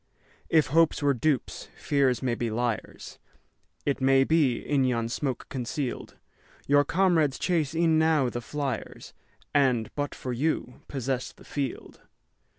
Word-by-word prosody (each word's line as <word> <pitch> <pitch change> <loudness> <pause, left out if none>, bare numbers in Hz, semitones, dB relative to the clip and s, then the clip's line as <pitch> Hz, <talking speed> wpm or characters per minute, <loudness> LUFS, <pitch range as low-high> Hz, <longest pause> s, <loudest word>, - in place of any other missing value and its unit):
If 160 -2 +4
hopes 165 -2 +3
were 140 -1 +4
dupes, 135 +1 -1
fears 135 -3 +1
may 125 -2 +1
be 120 0 -2
liars; 115 0 -4 0.7
It 140 -1 -1
may 135 0 +5
be, 140 -5 +2
in 140 -2 0
yon 115 -3 0
smoke 130 0 -3
conceal'd, 130 +1 -4 0.5
Your 145 0 +4
comrades 165 -5 +2
chase 165 -5 0
e'en 165 -1 +3
now 160 -4 +3
the 120 0 -4
fliers, 140 -1 -5 0.4
And, 130 -6 +2
but 145 -1 -3
for 125 - -5
you, 130 -1 -2
possess 130 -1 -3
the - - -19
field. 140 -4 -5
135 Hz, 140 wpm, -27 LUFS, 125-150 Hz, 0.7 s, may